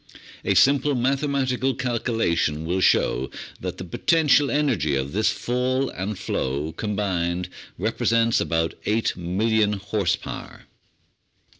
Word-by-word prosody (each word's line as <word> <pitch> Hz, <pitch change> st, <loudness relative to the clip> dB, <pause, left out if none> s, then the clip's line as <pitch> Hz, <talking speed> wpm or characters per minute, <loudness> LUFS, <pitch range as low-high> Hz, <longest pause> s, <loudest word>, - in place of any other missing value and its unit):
A -, -, +1 dB
simple 140 Hz, +1 st, +4 dB
mathematical 135 Hz, 0 st, 0 dB
calculation 115 Hz, -, 0 dB
will 90 Hz, +3 st, 0 dB
show 65 Hz, -7 st, +2 dB, 0.3 s
that 90 Hz, 0 st, -5 dB
the -, -, -6 dB
potential 145 Hz, -, +3 dB
energy 120 Hz, -, +1 dB
of 65 Hz, +1 st, -2 dB
this 110 Hz, +3 st, +2 dB
fall 130 Hz, +2 st, -1 dB
and 95 Hz, +2 st, -4 dB
flow 70 Hz, +2 st, -2 dB
combined 90 Hz, -2 st, -2 dB, 0.3 s
represents 115 Hz, +3 st, +1 dB
about 80 Hz, 0 st, 0 dB
8,000,000 105 Hz, +1 st, +1 dB
horse 100 Hz, -2 st, 0 dB
power. -, -, -9 dB
105 Hz, 110 wpm, -24 LUFS, 85-125 Hz, 0.3 s, simple